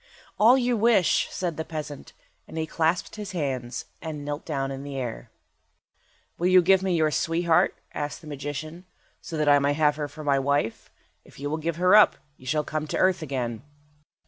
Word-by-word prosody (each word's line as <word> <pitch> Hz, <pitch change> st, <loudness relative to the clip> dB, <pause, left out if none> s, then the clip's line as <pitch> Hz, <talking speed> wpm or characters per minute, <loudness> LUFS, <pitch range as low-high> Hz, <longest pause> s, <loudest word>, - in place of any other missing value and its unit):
"All 235 Hz, +5 st, +7 dB
you 245 Hz, -1 st, +1 dB
wish," 220 Hz, -5 st, +3 dB
said 175 Hz, -4 st, -3 dB
the 160 Hz, -, -2 dB
peasant, 150 Hz, -3 st, -7 dB, 0.3 s
and -, -, -9 dB
he 160 Hz, -, -1 dB
clasped 165 Hz, +5 st, -1 dB
his 205 Hz, -2 st, -6 dB
hands, 130 Hz, -7 st, -3 dB, 0.2 s
and 150 Hz, -3 st, -6 dB
knelt 145 Hz, +1 st, -5 dB
down 135 Hz, -3 st, -2 dB
in 135 Hz, 0 st, -6 dB
the 140 Hz, -1 st, -6 dB
air. 125 Hz, -3 st, -5 dB, 1.1 s
"Will 175 Hz, -, +2 dB
you 185 Hz, -1 st, +6 dB
give 190 Hz, +1 st, +5 dB
me 190 Hz, -2 st, 0 dB
your 155 Hz, -2 st, +2 dB
sweetheart," 165 Hz, +2 st, +2 dB, 0.2 s
asked 145 Hz, -1 st, -4 dB
the -, -, -14 dB
magician, 150 Hz, +4 st, -6 dB, 0.4 s
"so 165 Hz, -4 st, -6 dB
that 150 Hz, -1 st, 0 dB
I 145 Hz, 0 st, +6 dB
may 140 Hz, +1 st, +1 dB
have 150 Hz, -1 st, +2 dB
her 150 Hz, -1 st, -2 dB
for 155 Hz, +2 st, -10 dB
my 140 Hz, -2 st, +2 dB
wife? 140 Hz, -4 st, -1 dB, 0.3 s
If -, -, -17 dB
you 145 Hz, +1 st, -3 dB
will 155 Hz, -, -1 dB
give 165 Hz, +1 st, -2 dB
her 180 Hz, +4 st, +4 dB
up, 210 Hz, -, +7 dB, 0.2 s
you 130 Hz, -, -15 dB
shall 150 Hz, +4 st, +1 dB
come 155 Hz, +1 st, -3 dB
to -, -, -2 dB
earth 185 Hz, -1 st, +2 dB
again." 125 Hz, -6 st, -3 dB
155 Hz, 200 wpm, -26 LUFS, 145-175 Hz, 1.1 s, All